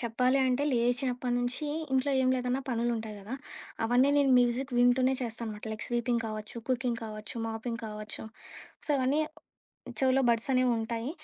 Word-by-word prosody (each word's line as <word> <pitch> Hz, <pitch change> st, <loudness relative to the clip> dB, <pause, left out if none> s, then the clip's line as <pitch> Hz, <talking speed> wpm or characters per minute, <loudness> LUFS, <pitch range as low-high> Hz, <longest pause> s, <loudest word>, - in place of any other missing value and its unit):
చెప్పాలి 250 Hz, +3 st, +2 dB
అంటే 255 Hz, +2 st, +1 dB
లేచినప్పటనుంచి 245 Hz, +2 st, 0 dB, 0.3 s
ఇంట్లో 265 Hz, +2 st, +2 dB
ఏం 255 Hz, -, +3 dB
లేదన్నా 250 Hz, +1 st, 0 dB
పనులుంటాయి 230 Hz, -3 st, -1 dB
గదా! 220 Hz, +7 st, -6 dB, 0.5 s
అవన్నీ 250 Hz, +4 st, +4 dB
నేను 280 Hz, -2 st, +4 dB
మ్యూజిక్ 245 Hz, +2 st, +1 dB
వింటూనే 255 Hz, +2 st, +4 dB
చేస్తానమాట 225 Hz, -2 st, -5 dB
లైక్ 215 Hz, -, -4 dB
స్వీపింగ్ 240 Hz, 0 st, 0 dB
కావచ్చు, 215 Hz, +1 st, -6 dB
కుకింగ్ 250 Hz, -2 st, 0 dB
కావచ్చు, 215 Hz, +1 st, -7 dB
మాపింగ్ 225 Hz, +1 st, -4 dB
కావచ్చు. 215 Hz, 0 st, -6 dB, 0.6 s
సో, -, -, -2 dB
అవన్నీ 270 Hz, +4 st, +2 dB, 0.8 s
చెవులో 265 Hz, 0 st, +3 dB
బడ్సనేవుంటాయి. 235 Hz, 0 st, +1 dB
245 Hz, 130 wpm, -30 LUFS, 230-255 Hz, 0.8 s, అవన్నీ